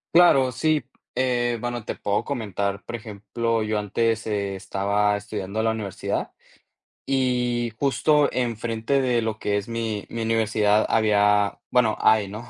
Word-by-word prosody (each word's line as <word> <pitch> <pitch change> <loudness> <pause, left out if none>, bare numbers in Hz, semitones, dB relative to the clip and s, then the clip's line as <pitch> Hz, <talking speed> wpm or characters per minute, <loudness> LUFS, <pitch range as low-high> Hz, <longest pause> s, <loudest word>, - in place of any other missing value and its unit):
Claro 135 -7 +6
si, 150 +5 0 0.3
eh, 120 -2 +1
bueno, 120 -1 -4
te - - -4
puedo 105 0 -1
comentar, 100 -6 -3
por 120 - -5
ejemplo, 110 +1 -2
yo 110 0 -1
antes, 115 +2 0
eh, 100 -2 -2
estaba 100 +2 0
estudiando 105 +1 -4
la 110 - +2
universidad 105 -4 -3 0.7
y 125 -3 0
justo 145 +1 +3
enfrente 120 +2 -1
de 120 -3 +1
lo 110 -1 -3
que 100 0 0
es 100 +1 -4
mi 115 -3 -3
mi 115 - -4
universidad 110 -2 +2
había 105 -2 +3
bueno, 115 -4 +3
hay, 110 -2 +4
¿no? 110 +5 -8
110 Hz, 145 wpm, -24 LUFS, 105-120 Hz, 0.7 s, Claro